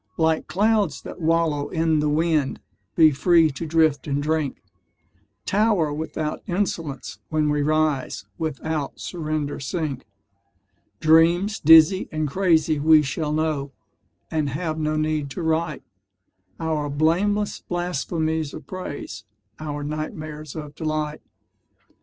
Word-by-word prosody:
Like 160 -1 +1
clouds 205 - +1
that - - -9
wallow 160 -3 +1
in 160 -2 +1
the 150 0 +1
wind 155 -2 +1 0.4
Be 160 -2 +6
free 165 +2 +4
to 150 +5 -6
drift 155 -3 +2
and 140 0 0
drink; 155 -2 -1 0.8
Tower 200 -7 +2
without 155 0 -4
insolence 170 -6 -3
when 155 -1 +1
we 150 0 +1
rise, 155 -2 0
Without 155 -1 -3
surrender 155 -4 -3
sink: 140 -3 -4 0.9
Dreams 170 +6 +4
dizzy 160 +5 +6
and 155 -1 -1
crazy 160 -2 +2
we 155 +1 +6
shall 150 +2 -2
know 150 -3 -1 0.6
And 155 -3 0
have 155 +3 -3
no 155 0 0
need 155 -2 -1
to 170 - -5
write 160 -1 -1 0.8
Our 155 -3 -1
blameless 185 +8 +1
blasphemies 160 -3 -2
of - - -9
praise, 145 - -7 0.4
Our 145 -1 -4
nightmares 155 0 -6
of 150 -2 -7
delight. 155 -1 -3
155 Hz, 120 wpm, -23 LUFS, 150-165 Hz, 0.9 s, Be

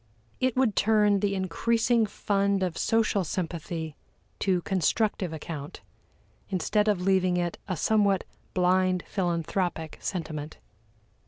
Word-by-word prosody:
It 255 -2 +1
would 245 -6 +3
turn 210 -1 +4
the 200 0 0
increasing 225 +5 +1
fund 200 -1 0
of 180 -3 -1
social 220 -3 +2
sympathy 165 -2 -4 0.4
to 185 -3 +1
constructive 195 0 0
account, 150 -2 -7 0.7
instead 210 +3 +1
of 205 -4 +2
leaving 185 -1 +2
it 175 -1 -2
a 185 -3 -2
somewhat 200 0 +2 0.3
blind 185 0 +2
philanthropic 170 -2 -2
sentiment. 155 -4 -4
185 Hz, 110 wpm, -27 LUFS, 175-205 Hz, 0.7 s, turn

